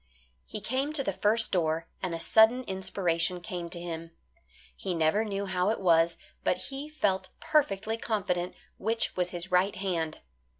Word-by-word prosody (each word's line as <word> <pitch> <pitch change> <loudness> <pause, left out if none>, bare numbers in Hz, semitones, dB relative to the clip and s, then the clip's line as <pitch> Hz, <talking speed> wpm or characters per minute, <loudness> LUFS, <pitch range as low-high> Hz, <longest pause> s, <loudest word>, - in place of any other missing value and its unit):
He 215 - -6
came 265 +7 -1
to 285 -3 +2
the 195 - -1
first 210 +4 +2
door, 165 -2 +1
and 180 -3 -2
a - - -5
sudden 220 +8 +5
inspiration 185 -3 0
came 175 -2 -5
to 170 - -6
him. 165 -1 -5 0.7
He 185 -3 -3
never 165 +6 +3
knew 200 -2 -2
how 185 0 +1
it 225 - 0
was, 170 -2 +4 0.3
but - - +2
he 280 +2 -6
felt 190 -11 0
perfectly 225 -8 +1
confident 180 -6 -1 0.2
which 225 +3 0
was 180 -1 +1
his 175 +1 -3
right 185 +3 +3
hand. 170 -5 -2
190 Hz, 165 wpm, -29 LUFS, 175-220 Hz, 0.7 s, sudden